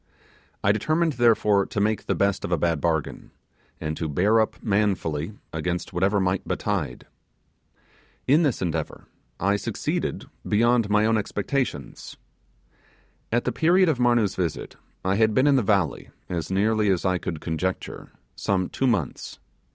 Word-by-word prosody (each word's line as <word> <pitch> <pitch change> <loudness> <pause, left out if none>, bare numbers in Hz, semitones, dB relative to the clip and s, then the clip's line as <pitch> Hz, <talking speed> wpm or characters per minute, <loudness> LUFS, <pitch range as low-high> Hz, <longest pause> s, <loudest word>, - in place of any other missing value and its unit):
I 100 - +4
determined, 155 +10 +1
therefore, 110 -5 +3
to 105 - -3
make 105 +1 0
the - - +1
best 100 -1 +1
of - - -4
a 90 - +2
bad 80 -1 0
bargain, 80 -3 -2 0.5
and 80 -1 -3
to 80 - -3
bear 100 +9 +3
up 110 - -1
manfully 100 -6 0 0.2
against 85 +3 -3
whatever 95 +3 +2
might 95 0 -1
betide. - - -2 1.2
In 150 +5 +4
this 140 - 0
endeavour, 80 -3 -3 0.3
I 100 +3 +2
succeeded - - -3 0.2
beyond 115 +1 +2
my 105 +1 +3
own 110 0 +3
expectations. 105 - -3 1.1
At 120 +1 +1
the 125 - -1
period 175 +7 +3
of 140 -6 0
Marnoo's 120 -5 +3
visit, 85 -4 -3 0.3
I 95 +1 +1
had 110 -1 +3
been 130 - +4
in 145 -1 +5
the 130 - +4
valley, 100 -7 0 0.2
as 85 -3 -3
nearly 105 +2 +2
as 95 -1 +1
I 90 -1 +1
could 80 -3 -4
conjecture, 85 +4 -4 0.2
some 95 -2 -1
two 135 - -1
months. 95 - -2
100 Hz, 150 wpm, -25 LUFS, 90-115 Hz, 1.2 s, in